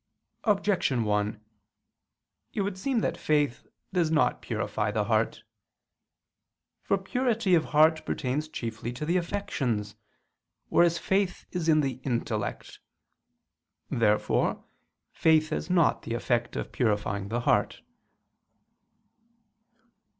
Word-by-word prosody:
Objection 195 - +2
1: 105 0 0 1.2
It 210 - 0
would 195 -1 -2
seem 235 +5 0
that - - -1
faith 145 -4 0 0.3
does 175 -4 +2
not 155 -2 +2
purify - - -2
the - - 0
heart. - - 0 1.4
For - - +1
purity 230 -6 0
of 170 - +6
the - - -11
heart 155 +1 +4
pertains 145 +3 -2
chiefly 115 -3 -5
to 130 +5 -5
the 170 +3 +2
affections, 130 - -2 0.7
whereas 170 0 +4
faith 190 0 0
is 170 -3 -1
in 155 -1 +5
the 135 -3 -2
intellect. 115 -5 -3 1.1
Therefore 105 -2 +1 0.5
faith 155 -1 +3
has 155 - -3
not 175 -4 +3
the 115 - -4
effect 120 0 -1
of - - -4
purifying 105 -4 0
the 120 +4 -2
heart. - - +1
150 Hz, 115 wpm, -28 LUFS, 115-180 Hz, 1.4 s, of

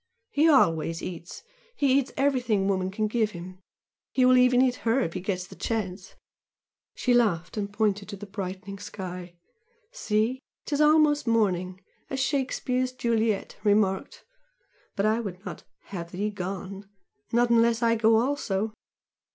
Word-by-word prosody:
He 305 +3 +4
always 165 - +3
eats, 170 -1 -7 0.3
he 275 - +3
eats 270 - -4
everything 250 -8 +1
woman 190 -1 0
can 215 +3 -1
give 215 0 0
him 185 +2 -9 0.5
he 255 - +3
will 255 0 +6
even 250 0 +5
eat 255 -1 +3
HER 230 +3 +1
if 165 - -2
he - - -3
gets 185 -1 -3
the - - -13
chance!" 195 -4 -4 0.8
She 250 - +1
laughed 205 -9 +2
and 200 -2 -3
pointed 205 -1 0
to 205 - -5
the 205 +1 -9
brightening 195 0 -6
sky. 180 -3 -7 0.6
"See? 230 - 0 0.3
''Tis 290 0 0
almost 300 -2 +4
morning!' 185 -5 +1 0.3
as 270 - -3
Shakespeare's 255 -2 0
Juliet 225 -4 0
remarked 205 -2 +1 0.7
but 200 - 0
I 215 +2 +2
would 195 -3 -6
not - - -7 0.3
'have 170 -3 -5
thee 205 +4 -2
gone' 195 0 -6 0.4
not 235 +1 +3
unless 230 0 +3
I 230 0 +4
go 225 0 +4
also. 220 -4 0
215 Hz, 150 wpm, -27 LUFS, 190-250 Hz, 0.8 s, will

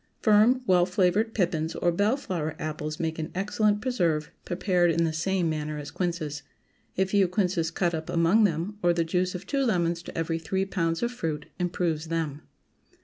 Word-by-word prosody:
Firm, 220 +4 +5
well 180 -4 +4
flavored 190 +4 +1
pippins 165 -5 0
or 175 - +1
bell 205 +9 +2
flower 165 - -3
apples 155 0 -4
make 160 -1 -2
an 155 +1 -3
excellent 210 +2 +1
preserve, 170 - 0
prepared 180 -1 +2
in 165 0 +2
the 160 -1 0
same 175 +2 0
manner 155 -1 -2
as 145 0 -7
quinces. 170 -4 -3 0.6
A 190 - +3
few 195 0 +3
quinces 180 -3 0
cut 170 +1 0
up 160 0 -4
among 170 +7 +4
them, 195 +3 -1
or 175 0 +3
the 170 -1 +1
juice 180 +2 -1
of 180 +1 -6
two 275 +4 0
lemons 175 -7 +1
to 170 - -9
every 165 0 -1
three 190 +4 -1
pounds 165 -3 -1
of 235 - 0
fruit 160 -10 -3
improves 170 -3 -1
them. 160 -3 -2
175 Hz, 185 wpm, -27 LUFS, 160-195 Hz, 0.6 s, Firm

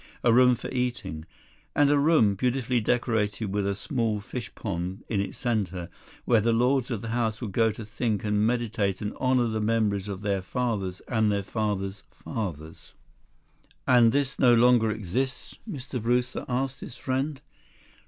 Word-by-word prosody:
A 120 - +5
room 125 +1 +6
for 120 - -7
eating. 120 -11 -3 0.5
And 145 -1 +4
a 145 - +4
room, 140 -9 +4
beautifully 125 +2 0
decorated 110 -3 0
with 100 -1 0
a 100 - 0
small 115 - -1
fish 120 +4 -7
pond 95 0 -4
in 105 - 0
its 100 -1 -5
center, 100 -8 -2 0.4
where 115 -3 +4
the 115 +2 +2
lords 125 +2 +2
of 115 -5 -3
the 115 - -4
house 115 -2 -1
would 115 -5 -5
go 115 +3 +3
to 110 +1 -8
think 110 -1 -2
and 105 0 +1
meditate 110 -4 0
and 105 - -3
honor 130 -1 +3
the 110 -1 -1
memories 105 -3 +1
of 100 -1 -5
their 100 -2 0
fathers 100 -3 -2
and 110 -3 +2
their 100 -1 0
fathers' 100 -2 -2
fathers." 80 -7 -7 0.9
"And 120 -3 +6
this 140 0 0
no 125 -2 +6
longer 120 -1 +5
exists?" 110 +5 -3 0.2
Mr. 130 - -5
Brewster 125 +2 0
asked 130 +1 -1
his - - -8
friend. 135 +3 -2
115 Hz, 165 wpm, -27 LUFS, 100-125 Hz, 0.9 s, room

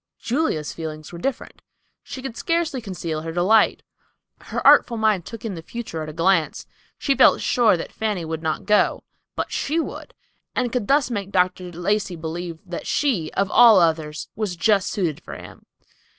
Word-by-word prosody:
Julia's 230 - -1
feelings 155 0 -7
were 170 - -7
different. 270 +8 -4 0.4
She 260 - -9
could 255 -4 -5
scarcely 330 -5 -1
conceal 175 -6 -4
her 165 +1 -5
delight. 185 +6 +3 0.6
Her - - -5
artful 235 - +6
mind 215 -5 +1
took 230 -1 -8
in 215 - -3
the 165 - -7
future 190 -3 -6
at 155 - -5
a - - -5
glance. 165 +1 +1 0.3
She 275 - +1
felt - - +5
sure 230 -7 +3
that 165 - -6
Fanny 210 -6 -2
would 160 0 -4
not 160 +1 -2
go; 210 +1 +2 0.3
but - - -3
she 310 +4 -1
would, 325 - -6 0.4
and 250 -2 0
could 240 -5 -2
thus 280 -2 +2
make 200 -4 -3
Dr. 180 -1 0
Lacey 185 +2 -1
believe 165 +1 -5
that 175 -2 -6
she, 220 - 0
of 195 +1 0
all 235 -4 +8
others, 160 -3 0
was 210 -4 -3
just 195 +2 +2
suited 170 -8 -2
for - - -9
him. - - -12
190 Hz, 180 wpm, -22 LUFS, 165-230 Hz, 0.6 s, all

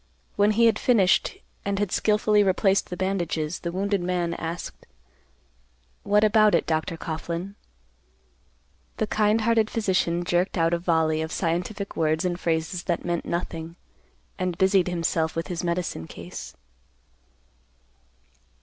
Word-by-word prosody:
When 205 +1 +3
he 230 +2 +4
had 225 -2 +3
finished 205 -7 +3 0.3
and 200 0 -1
had 205 -2 -1
skilfully 210 0 +3
replaced 195 0 +2
the 180 - -5
bandages, 175 -4 -2
the 170 - -4
wounded 200 +1 0
man 175 -1 -1
asked, 165 +1 -6 1.1
"What 210 +1 +3
about 215 0 +5
it, - - +1
Dr. 160 +1 -1
Coughlan?" 170 +4 -4 1.4
The 220 - +1
kind 215 +1 +2
hearted 225 -1 +2
physician 180 -5 0
jerked 175 +2 0
out 165 0 +2
a 170 - +1
volley 160 -2 +1
of 160 +1 -4
scientific 180 +5 -2
words 160 +2 +1
and 175 -1 -1
phrases 165 +2 -1
that 170 -2 -1
meant 175 -1 -2
nothing, 165 -1 -4 0.6
and 180 -2 -2
busied 190 -1 +3
himself 165 -2 -1
with 165 +3 -3
his 175 -1 -3
medicine 170 - -2
case. - - -9
180 Hz, 135 wpm, -25 LUFS, 165-200 Hz, 1.4 s, about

